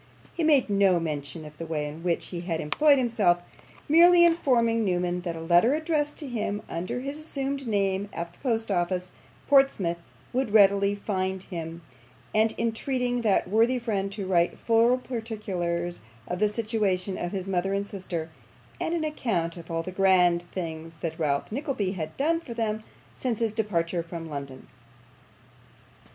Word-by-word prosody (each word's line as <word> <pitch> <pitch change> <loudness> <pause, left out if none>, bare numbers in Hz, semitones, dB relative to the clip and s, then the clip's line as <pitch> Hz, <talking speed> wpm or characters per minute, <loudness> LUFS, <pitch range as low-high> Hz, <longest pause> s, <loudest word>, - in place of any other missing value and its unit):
He 335 - -2
made 295 -4 +4
no 195 -3 +3
mention 155 0 -4
of 150 0 -12
the 165 - -4
way 150 -2 -2
in 150 +2 -8
which 170 -1 -1
he 175 - -5
had 170 -2 -2
employed 285 - +4
himself; 225 -8 +3 0.5
merely 345 +3 +7
informing 240 -9 +3
Newman 180 -2 0
that 175 -2 -4
a 165 - -6
letter 175 - +4
addressed 305 -2 -1
to 295 - -6
him 210 -4 -3
under 180 +9 -3
his 280 +3 -5
assumed 275 -3 -3
name 200 -2 0
at 170 0 -5
the - - -23
Post 225 -5 -1
Office, 180 0 -1 0.4
Portsmouth, 270 -12 +3 0.3
would 250 -4 -1
readily 200 -1 +5
find 190 -2 -2
him, 165 -2 -7 0.5
and 220 +1 +3
entreating 245 +2 0
that 210 -5 +2
worthy 225 +6 +3
friend 205 -5 -2
to 200 -2 -4
write 175 -2 +2
full 230 +2 +3
particulars 195 -8 -3 0.3
of 180 - -3
the 210 0 +3
situation 210 -4 -1
of 175 - -3
his 195 -2 -4
mother 190 0 0
and 200 0 0
sister, 175 -5 -5 0.5
and 335 - -1
an 330 - -1
account 215 - -1
of 170 -2 -11
all 165 0 -1
the 185 - -6
grand 180 -2 +4
things 165 -2 -6
that 165 -1 -4
Ralph 145 0 0
Nickleby 255 - -2
had 160 -5 -5
done 330 +4 +2
for 250 -8 -9
them 220 -2 -1 0.3
since 245 -4 -2
his 225 -2 0
departure 175 -6 0
from 165 -1 -7
London. 140 -2 -7
200 Hz, 165 wpm, -27 LUFS, 175-235 Hz, 0.5 s, merely